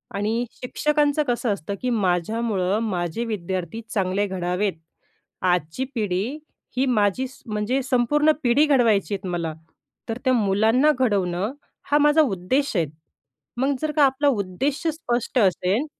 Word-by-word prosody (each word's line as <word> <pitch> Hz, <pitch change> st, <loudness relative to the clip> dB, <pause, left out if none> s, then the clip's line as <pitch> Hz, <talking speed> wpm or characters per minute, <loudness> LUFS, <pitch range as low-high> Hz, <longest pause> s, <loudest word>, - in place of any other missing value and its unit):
आणि 220 Hz, +4 st, 0 dB
शिक्षकांचं 295 Hz, +3 st, 0 dB
कसं 240 Hz, -2 st, 0 dB
असतं, 200 Hz, +1 st, -5 dB
की 255 Hz, -, -1 dB
माझ्यामुळं 205 Hz, 0 st, 0 dB
माझे 190 Hz, -1 st, -2 dB
विद्यार्थी 190 Hz, -1 st, -4 dB
चांगले 195 Hz, 0 st, 0 dB
घडावेत. 185 Hz, +1 st, -1 dB, 0.7 s
आजची 180 Hz, -, 0 dB
पिढी 210 Hz, +5 st, -1 dB, 0.4 s
ही 260 Hz, -, +3 dB
माझी 215 Hz, +2 st, +1 dB
स 260 Hz, -, -17 dB
म्हणजे 215 Hz, +4 st, -1 dB
संपूर्ण 275 Hz, +4 st, +3 dB
पिढी 255 Hz, +5 st, +4 dB
घडवायचीयेत 215 Hz, -8 st, +2 dB
मला, 170 Hz, -3 st, -2 dB, 0.6 s
तर 225 Hz, -, -2 dB
त्या 260 Hz, -, +4 dB
मुलांना 225 Hz, +6 st, +3 dB
घडवणं 200 Hz, -3 st, 0 dB, 0.4 s
हा 295 Hz, -, +5 dB
माझा 295 Hz, +1 st, +5 dB
उद्देश 255 Hz, -, 0 dB
आहे. 170 Hz, -3 st, +2 dB, 0.7 s
मग 270 Hz, +3 st, +1 dB
जर 310 Hz, -, 0 dB
का 300 Hz, -, +5 dB
आपला 275 Hz, +2 st, +1 dB
उद्देश 240 Hz, +4 st, 0 dB
स्पष्ट 250 Hz, -6 st, -1 dB
असेल 195 Hz, -, +2 dB
225 Hz, 130 wpm, -23 LUFS, 190-260 Hz, 0.7 s, हा